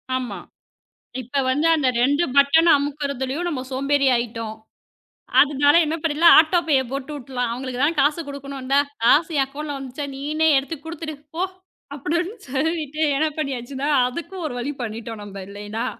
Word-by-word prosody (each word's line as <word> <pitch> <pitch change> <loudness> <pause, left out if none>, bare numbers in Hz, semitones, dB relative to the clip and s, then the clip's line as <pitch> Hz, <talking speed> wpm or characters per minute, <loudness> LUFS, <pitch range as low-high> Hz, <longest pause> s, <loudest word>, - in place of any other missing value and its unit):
ஆமா. 255 -2 -4 0.8
இப்ப 255 +3 -2
வந்து 295 +5 +1
அந்த 275 -4 +1
2 285 +6 +3
பட்டன் 300 +4 +5
அமுக்குறதுலயும் 280 +2 -3
நம்ம 265 -6 -3
சோம்பேறி 275 +1 +1
ஆயிட்டோம். 230 -2 -3 0.9
அதனால 290 0 +3
என்ன 310 +2 -1
பண்ணலாம்? 330 +2 +6
ஆட்டோ 335 +2 +4
பே, 300 - +3 0.2
போட்டு 275 +2 -4
விட்டுடலாம். 250 -3 -3
அவங்களுக்கு 255 0 -5
தான் 320 +3 +1
காசு 295 +3 +2
குடுக்கணும், 280 -1 -7
இந்தா 275 +2 +3 0.3
காசு 315 +7 +4
என் 270 - +4
அக்கவுன்ட்ல 290 +1 -6
வந்துருச்சா. 270 +2 -6
நீனே 310 +3 0
எடுத்துக் 285 +2 -4
குடுத்துடு 325 -2 -6 0.2
போ. 365 - +1 0.5
அப்டின்னு 340 - -2
சொல்லிட்டு 305 +2 -2 0.2
என்ன 315 - +2
பண்ணியாச்சுன்னா 275 -1 -3 0.2
அதுக்கும் 340 +5 -6
ஒரு 285 - -6
வழி 275 +4 -3
பண்ணிட்டோம். 225 -1 -6
நம்ம 195 -1 -8
இல்லைன்னா. 205 +4 -5
280 Hz, 150 wpm, -22 LUFS, 255-310 Hz, 0.9 s, பண்ணலாம்